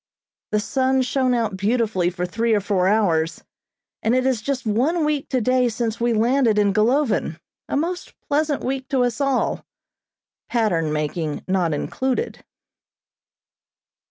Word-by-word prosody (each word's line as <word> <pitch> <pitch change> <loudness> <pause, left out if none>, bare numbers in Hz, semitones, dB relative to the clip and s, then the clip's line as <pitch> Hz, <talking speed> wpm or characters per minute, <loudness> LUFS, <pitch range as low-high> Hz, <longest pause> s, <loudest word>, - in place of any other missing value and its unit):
The 210 - +1
sun 260 +4 +1
shone 255 -1 +1
out 225 -4 -1
beautifully 205 -3 +1
for 180 0 -3
three 225 +5 +1
or - - +3
four 195 -2 +1
hours, 175 -6 +1 0.6
and 225 +3 +2
it 255 0 +1
is 260 -4 +1
just 260 +1 -3
one 280 +10 +1
week 300 -2 -1
today 255 0 +2
since 230 0 -3
we 240 0 +2
landed 230 0 +2
in 205 -1 +3
Golovin, 225 - +1 0.3
a - - 0
most 350 +4 -3
pleasant 295 -1 0
week 265 0 -3
to 265 -4 +2
us 245 +3 -1
all 275 -2 0 0.9
(pattern 180 -10 +1
making 150 0 -2
not 185 -3 +1
included). 255 - -2
230 Hz, 140 wpm, -22 LUFS, 200-265 Hz, 0.9 s, or